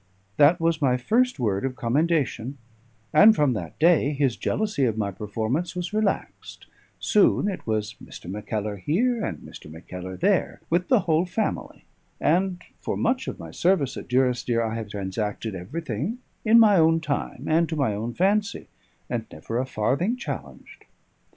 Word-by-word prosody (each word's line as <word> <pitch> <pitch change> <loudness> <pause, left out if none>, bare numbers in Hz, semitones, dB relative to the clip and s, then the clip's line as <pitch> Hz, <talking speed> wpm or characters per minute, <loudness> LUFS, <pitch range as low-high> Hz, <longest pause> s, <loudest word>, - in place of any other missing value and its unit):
That 155 +5 +6
was 165 -1 +1
my 130 -3 +3
first 235 - +1
word 100 -5 0
of 130 -1 -2
commendation; 140 -1 0 0.6
and 220 +1 +8
from 145 -7 +2
that 85 -8 -6
day 155 -2 +4
his 135 -4 +1
jealousy 210 -11 0
of 110 -3 0
my 100 -2 -1
performance 110 - -3
was 180 +2 -4
relaxed; 215 -2 -2 0.3
soon 205 -1 +3
it 195 -10 -4
was 105 -1 -1
"Mr. - - -11
Mackellar" 105 +1 -4
here, 220 - 0
and - - -3
"Mr. - - -12
Mackellar" 90 +3 -8
there, - - +1
with 180 +2 +2
the 250 -6 +4
whole 165 +1 +1
family; 220 +5 -3 0.3
and 180 0 +1 0.2
for - - -3
much 255 +2 0
of - - -4
my - - -9
service 170 -7 +1
at - - -7
Durrisdeer 125 -2 +1
I 110 -1 -2
have 115 -2 -5
transacted 105 +2 -3
everything 140 - -4 0.3
at 220 - +6
my 215 -4 +7
own 165 0 +4
time, 140 -4 -3
and 165 +1 +2
to 160 - -2
my 140 -8 +1
own 115 +4 -4
fancy, 200 +2 0 0.4
and - - -3
never 115 +10 -4
a 130 - -2
farthing 140 - 0
challenged. 255 - -8
140 Hz, 165 wpm, -25 LUFS, 110-180 Hz, 0.6 s, and